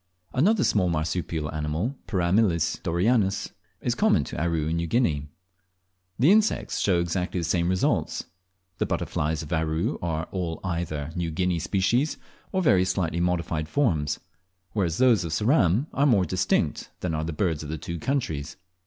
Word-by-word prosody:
Another 195 - +3
small 95 -4 +2
marsupial 80 -1 -2
animal 80 - -2
(Perameles 90 -2 +1
doreyanus) 95 +3 +1 0.3
is - - 0
common - - +3
to - - -5
Aru 85 -3 0
and 80 +1 0
New 85 0 -1
Guinea. 80 - +1 0.9
The 140 - +5
insects 215 +1 +2
show 90 -4 +2
exactly 90 +1 -1
the - - -2
same 85 +1 +1
results. 95 0 0 0.6
The - - +1
butterflies 80 +1 -1
of 75 - -5
Aru 80 +1 0
are 80 -2 -1
all 85 -4 -3
either 80 -4 -3
New 85 -2 -1
Guinea 90 +1 0
species, 105 - +1 0.3
or 190 -1 0
very 95 - +5
slightly 85 -3 -1
modified 85 -3 -1
forms; 80 - +1 0.5
whereas 90 -6 0
those 125 -7 +4
of 80 -2 -4
Ceram 105 - +3
are 140 +2 +3
more 100 -8 +4
distinct 95 +2 0
than 90 -3 -1
are 80 0 -1
the 80 - -3
birds 80 -2 -1
of 75 - -7
the 80 - -3
two 85 +2 -5
countries. 80 - -2
85 Hz, 160 wpm, -26 LUFS, 80-100 Hz, 0.9 s, The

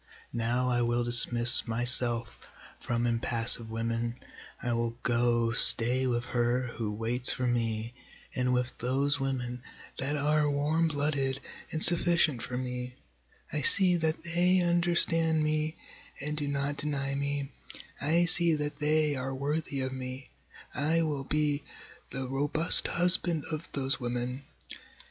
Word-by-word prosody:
Now 120 +2 -1
I 120 -1 0
will 120 0 0
dismiss 120 0 +4
myself 120 0 -2 0.3
from 120 0 -2
impassive 115 -1 -1
women, 115 +1 -3 0.4
I 120 -1 -2
will 115 0 -2
go 120 -1 +1
stay 120 +2 +3
with 120 -1 -2
her 125 +1 0
who 110 -3 -3
waits 115 +4 -1
for 130 - -2
me, 115 -1 -2 0.4
and 125 0 -1
with 125 0 -1
those 140 +3 0
women 125 -2 -4 0.4
that 140 +2 -1
are 150 +1 +1
warm 150 +3 0
blooded 145 -3 -1 0.3
and 155 - -2
sufficient 170 -6 +3
for 125 +1 -5
me, 125 0 -5 0.6
I 150 - -1
see 185 +5 +4
that 160 -2 -2
they 175 +2 +2
understand 170 -2 +2
me 155 +1 -1 0.4
and 150 +2 -3
do 150 -1 -3
not 140 0 -2
deny 140 -2 -3
me, 140 0 -3 0.5
I 165 +4 +2
see 170 -1 +1
that 150 -1 -4
they 150 0 +1
are 135 0 -4
worthy 145 0 -3
of 130 0 -4
me, 130 0 -8 0.4
I 160 +5 0
will 145 -4 -3
be 150 0 0 0.5
the 135 -1 -5
robust 145 +5 +7
husband 175 -3 +3
of 155 +1 -6
those 135 0 0
women. 125 +2 -4
135 Hz, 140 wpm, -29 LUFS, 120-150 Hz, 0.6 s, robust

